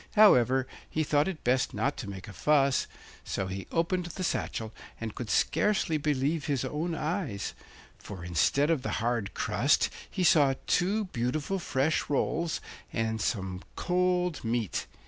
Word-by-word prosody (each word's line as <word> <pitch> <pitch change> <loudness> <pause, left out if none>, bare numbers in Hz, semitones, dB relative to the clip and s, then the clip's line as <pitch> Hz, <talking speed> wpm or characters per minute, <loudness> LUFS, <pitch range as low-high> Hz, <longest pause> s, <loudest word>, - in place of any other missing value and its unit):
However, 130 - +6 0.2
he 155 - 0
thought 145 +1 +2
it 185 -5 -5
best 125 +1 +1
not 140 +2 0
to 100 - -5
make 95 -1 -8
a 105 - -9
fuss, 140 -1 +3 0.4
so 95 - -2
he 95 +1 -5
opened 175 +2 0
the 180 +2 -5
satchel, 110 -9 -2 0.3
and 115 -1 -4
could 120 -4 -6
scarcely 190 - +2
believe 145 +1 0
his 140 -3 0
own 160 +5 -2
eyes, 155 - -2 0.5
for, 95 -4 -8
instead 135 - +2
of 155 -5 +1
the - - -3
hard 115 -3 -1
crust, - - +2 0.2
he 185 - -2
saw 145 -6 +5
two 205 +4 +2
beautiful 150 +5 -2
fresh 145 -2 0
rolls 160 +3 0 0.3
and 110 -1 -1
some 95 -4 -2
cold 180 -3 +1
meat. 115 -3 -1
140 Hz, 150 wpm, -29 LUFS, 115-170 Hz, 0.5 s, However